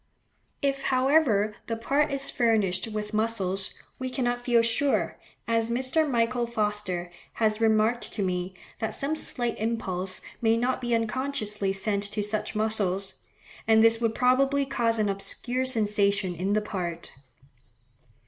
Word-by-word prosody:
If, 275 -1 +1
however, 255 -6 +3
the 230 - -1
part 280 +6 +1
is 275 0 -1
furnished 215 -5 +1
with 210 -1 -5
muscles, 200 -4 0 0.3
we 255 0 -3
cannot 245 -2 -1
feel 240 -2 +3
sure, 270 +5 0 0.3
as 230 0 +1
Mr. 260 +6 +1
Michael 240 -1 +1
Foster 210 -6 -2 0.2
has 215 -1 0
remarked 220 +2 +2
to 205 - -1
me, 180 0 -2 0.2
that 220 - -2
some 285 +3 -1
slight 240 -6 -1
impulse 190 -5 -2 0.2
may 225 -1 +3
not 250 +2 0
be 240 -1 +1
unconsciously 225 -4 -1
sent 200 +1 0
to 210 - 0
such 210 +1 -2
muscles; 200 -3 0 0.5
and 220 0 +6
this 225 0 +4
would 225 -1 0
probably 270 +2 +3
cause 235 -4 +1
an 215 -1 +1
obscure 240 +6 -2
sensation 205 -5 +2
in 185 +4 -1
the 215 - +2
part. 175 -5 -5
225 Hz, 140 wpm, -27 LUFS, 205-245 Hz, 0.5 s, and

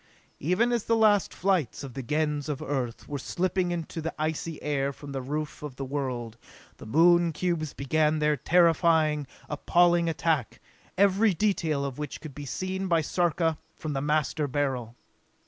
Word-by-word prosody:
Even 180 - +2
as 235 -3 0
the 230 - +2
last 215 -3 +4
flights 180 - 0
of 135 -3 -7
the 135 - -4
Gens 150 +2 -1
of 145 -2 -2
Earth 135 -6 -3
were 145 -2 -4
slipping 185 +5 -1
into 170 -1 -4
the 165 +1 -4
icy 155 +1 -3
air 140 -2 0
from 140 +1 -10
the 135 -1 -3
roof 150 +3 -4
of 150 -4 -7
the 135 - -5
world, 130 -5 -4 0.4
the - - -11
Moon 170 +6 +5
cubes 160 -2 -2
began 155 +2 +1
their 150 0 +2
terrifying, 160 -1 +3 0.2
appalling 170 +3 +3
attack, 160 -6 -1 0.4
every 200 +1 +4
detail 160 -7 0
of 135 0 -5
which 150 -2 -5
could 155 -3 -9
be 145 +2 -7
seen 185 +6 -3
by 170 -2 +3
Sarka 165 0 0 0.2
from 155 -2 -4
the 135 - -1
Master 150 0 0
Beryl. 130 -4 -2
155 Hz, 165 wpm, -27 LUFS, 140-175 Hz, 0.4 s, Moon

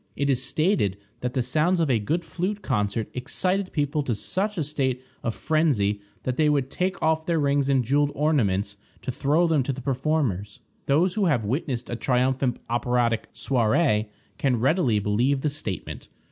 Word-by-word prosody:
It 140 0 +1
is 130 -2 +1
stated 135 - +1 0.2
that 125 +1 -3
the 130 - +1
sounds 155 +8 +1
of 165 - +2
a 125 -5 +2
good 160 +11 -1
flute 185 +5 -3
concert 105 - -1
excited 185 +9 -1
people 145 0 0
to 125 -5 -1
such 195 - -2
a 160 - +1
state 130 -4 -1 0.2
of 115 - -2
phrensy 130 -11 +1 0.2
that 130 -1 -2
they 155 -1 +4
would 140 -3 +1
take 185 +1 -1
off 160 0 +1
their 170 -1 +2
rings 140 -1 +1
and 135 -2 +3
jeweled 145 +3 +2
ornaments 105 -10 +1 0.3
to - - -2
throw 150 +7 +2
them 160 -4 +2
to 130 - -1
the 135 - -6
performers: 130 - -1 0.3
those 165 +6 +3
who 210 -2 +1
have 130 - +1
witnessed 125 +1 -2
a 120 - -3
triumphant 125 +1 +1
operatic 120 -1 0
soirée 110 0 +2 0.3
can 130 -4 +1
readily 130 - +2
believe 115 +7 +1
the 150 - 0
statement. 105 - -5
135 Hz, 175 wpm, -25 LUFS, 120-155 Hz, 0.3 s, they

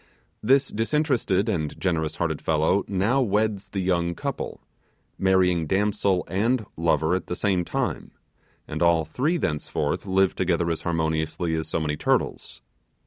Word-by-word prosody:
This 135 +5 +3
disinterested 115 - +1
and 80 -9 -2
generous 80 -4 -1
hearted - - -2
fellow 80 +5 +2
now 100 +8 +1
weds 105 -3 0
the 95 0 -3
young 85 -2 0
couple - - -4 0.6
marrying 90 -4 +3
damsel 100 -1 +1
and 110 +4 0
lover 80 0 +1
at 95 - -2
the 90 - -3
same 95 -1 +1
time - - -3 0.6
and - - -5
all 85 -2 +4
three 140 - 0
thenceforth 75 - -2
live 95 0 +3
together 85 -2 0
as 80 - -3
harmoniously 80 0 -1
as 80 -1 -2
so 80 - -1
many 75 -1 -2
turtles. - - -1
90 Hz, 140 wpm, -25 LUFS, 80-100 Hz, 0.6 s, all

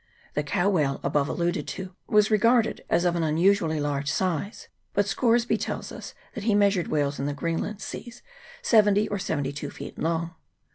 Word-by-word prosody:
The 150 - 0
cow 175 +6 0
whale 150 -8 +1
above 145 -1 +1
alluded 170 -3 -1
to 190 -1 -6
was 210 0 +4
regarded 230 +2 +3
as 175 - +2
of 175 -1 +2
an 170 - 0
unusually 165 0 +2
large 145 -1 -1
size; 185 +3 -2 0.3
but 205 0 +3
Scoresby 235 +1 +2
tells - - -4
us - - -9 0.2
that 220 -5 -6
he 215 -3 +3
measured 200 -3 +3
whales 145 -2 0
in 140 - -1
the 145 - -2
Greenland 170 +6 -3
seas 240 0 -8 0.4
seventy 210 -2 +4
or 205 - -3
seventy 145 -7 -2
two 145 0 -5
feet - - -9
long. 165 +1 -1
175 Hz, 180 wpm, -26 LUFS, 150-205 Hz, 0.4 s, was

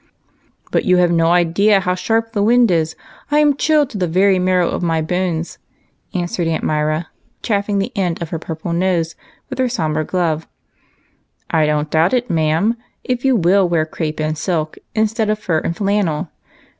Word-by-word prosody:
" - - -35
But - - +1
you 180 - +3
have 175 -1 +3
no 165 -1 +3
idea 175 +4 +3
how 180 -1 0
sharp 225 +5 -1
the 205 - 0
wind 235 0 +4
is. 160 -2 0 0.3
I 295 - +2
am 295 -1 +4
chilled 300 -1 +2
to 205 - -5
the 180 - +1
very 190 +3 +3
marrow 180 -1 +2
of - - -2
my 165 -2 +1
bones," 170 0 -2 0.6
answered 175 -1 -1
Aunt 165 -1 -1
Myra, 155 +2 -1 0.3
chafing 205 -2 0
the 195 - -2
end 180 -4 -1
of 170 - -5
her 165 - -4
purple 165 +1 -5
nose 170 -2 0 0.4
with 260 - -5
her 255 -1 +2
sombre 155 -9 -1
glove. 165 -2 -1 0.5
" - - -23
I 155 -2 +3
don't 150 0 -1
doubt 165 +8 +3
it, 245 0 -1
ma'am, 165 +8 +1 0.3
if 250 -1 -2
you 265 -2 +3
will 190 -1 +3
wear 165 -2 +1
crape 155 -1 -4
and 155 0 -1
silk 155 -1 -2 0.2
instead 220 0 +1
of 215 - +1
fur 170 -6 -1
and 170 - -3
flannel. 195 -5 0
180 Hz, 190 wpm, -18 LUFS, 160-205 Hz, 0.6 s, wind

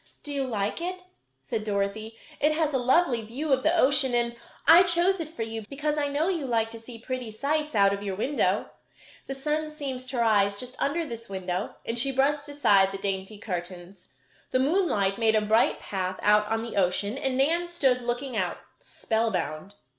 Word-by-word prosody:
"Do 290 - -5
you 275 -1 -1
like 215 +3 -2
it?" 365 +1 -4 0.4
said 225 -4 -4
Dorothy. 215 +2 -2 0.2
"It 300 +1 +3
has 310 -2 0
a 265 - +2
lovely 255 -1 +3
view 270 +7 -2
of 260 - +2
the 320 +5 +2
ocean 265 -3 +4
and 235 0 0 0.3
I 335 +2 +9
chose 350 +2 +3
it 320 -2 -4
for 235 -8 -5
you 225 0 -5
because 295 +2 -2
I 295 -1 0
know 290 +4 0
you 335 -8 -1
like 225 -2 0
to 230 - -9
see 230 +1 -11
pretty 250 0 -5
sights 295 +6 -2
out 200 -1 +4
of 200 - -4
your 195 -2 -3
window. 265 +9 0 0.6
The 270 - -4
sun 305 +3 -2
seems 270 -4 -6
to 255 0 -4
rise 205 -3 +2
just 250 0 -7
under 330 +4 0
this 230 -5 -8
window," 185 0 -4
and 230 +1 -1
she 275 +3 +3
brushed 285 +2 +1
aside 205 -9 +3
the 195 - -5
dainty 195 +1 -4
curtains. 180 -1 -7 0.4
The - - +1
moonlight 260 - +1
made 220 -1 +3
a - - +5
bright 220 +2 +2
path 185 -1 -3
out 210 0 +4
on 225 +1 -1
the 230 -3 -6
ocean 200 +3 +1
and 265 -1 -2
Nan 335 +6 +2
stood 270 -8 +1
looking 245 +1 -3
out, 185 -4 -1 0.2
spellbound. 200 -5 -2
240 Hz, 195 wpm, -27 LUFS, 205-290 Hz, 0.6 s, I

